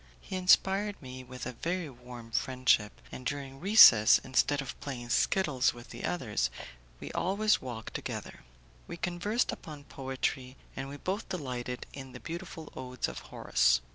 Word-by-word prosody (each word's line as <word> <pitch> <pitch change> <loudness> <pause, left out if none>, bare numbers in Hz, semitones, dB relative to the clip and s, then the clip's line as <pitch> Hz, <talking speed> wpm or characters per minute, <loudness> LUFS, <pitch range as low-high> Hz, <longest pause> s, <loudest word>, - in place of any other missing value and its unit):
He 185 - -7
inspired 190 +2 +3
me 130 -1 -9
with 130 0 -8
a 125 - -3
very 170 +7 -3
warm 120 -3 -11
friendship, 125 -4 +1
and 130 - -8
during 135 0 -4
recess, 160 - +9
instead 135 +2 +2
of 135 -2 -5
playing 120 -4 -6
skittles 135 -3 +2
with 120 0 -12
the 120 - -6
others, 105 - 0 0.5
we - - -7
always 210 +3 +2
walked 120 -3 -7
together. - - -5 0.5
We - - -6
conversed 180 +8 0
upon 150 -3 -9
poetry, 130 -1 -3 0.2
and 135 0 -5
we 145 - -7
both 190 +8 -3
delighted 125 -7 -4
in 135 -2 -9
the - - -8
beautiful 170 -2 -7
odes 125 -1 -3
of 60 - -6
Horace. - - +3
135 Hz, 155 wpm, -31 LUFS, 125-175 Hz, 0.5 s, recess